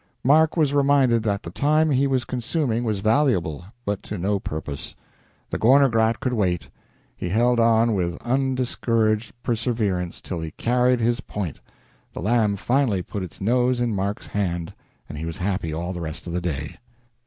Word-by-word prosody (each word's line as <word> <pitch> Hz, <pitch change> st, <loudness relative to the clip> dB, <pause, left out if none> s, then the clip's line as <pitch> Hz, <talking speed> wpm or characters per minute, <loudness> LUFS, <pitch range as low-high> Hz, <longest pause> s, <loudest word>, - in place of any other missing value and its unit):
Mark 155 Hz, +5 st, +4 dB
was 150 Hz, -3 st, +2 dB
reminded 140 Hz, -4 st, +4 dB
that 100 Hz, -2 st, -1 dB
the 85 Hz, -, -7 dB
time 155 Hz, -, +2 dB
he 140 Hz, +1 st, +3 dB
was 130 Hz, -3 st, 0 dB
consuming 125 Hz, -1 st, -1 dB
was 105 Hz, -4 st, -1 dB
valuable, 110 Hz, -, +1 dB, 0.2 s
but 100 Hz, -1 st, -2 dB
to 105 Hz, -, -6 dB
no 100 Hz, +3 st, 0 dB
purpose. 75 Hz, -4 st, -6 dB, 0.6 s
The -, -, -2 dB
Gorner 135 Hz, +4 st, +5 dB
Grat 110 Hz, 0 st, +2 dB
could 125 Hz, 0 st, -1 dB
wait. 90 Hz, -6 st, 0 dB, 0.5 s
He 90 Hz, -, -4 dB
held 120 Hz, +5 st, +3 dB
on 115 Hz, 0 st, +4 dB
with 85 Hz, -3 st, -1 dB
undiscouraged 120 Hz, -4 st, 0 dB
perseverance 110 Hz, -7 st, -1 dB
till 85 Hz, -3 st, -5 dB
he 80 Hz, -, -4 dB
carried 125 Hz, 0 st, +2 dB
his 120 Hz, +2 st, +1 dB
point; 95 Hz, -, -5 dB, 0.5 s
the -, -, -6 dB
lamb 110 Hz, -2 st, +2 dB
finally 120 Hz, -3 st, +1 dB
put 100 Hz, -, -5 dB
its 90 Hz, -3 st, -8 dB
nose 125 Hz, +4 st, +2 dB
in 120 Hz, -2 st, 0 dB
Mark's 100 Hz, +1 st, -2 dB
hand, 85 Hz, -5 st, -2 dB, 0.3 s
and 75 Hz, -, -7 dB
he 80 Hz, -, -4 dB
was 85 Hz, -, -5 dB
happy 95 Hz, -3 st, -2 dB
all 85 Hz, +4 st, -3 dB
the 90 Hz, -, -5 dB
rest 80 Hz, +1 st, -6 dB
of 85 Hz, -, -5 dB
the 90 Hz, -, -1 dB
day. 75 Hz, -4 st, -4 dB
110 Hz, 175 wpm, -23 LUFS, 90-125 Hz, 0.6 s, Gorner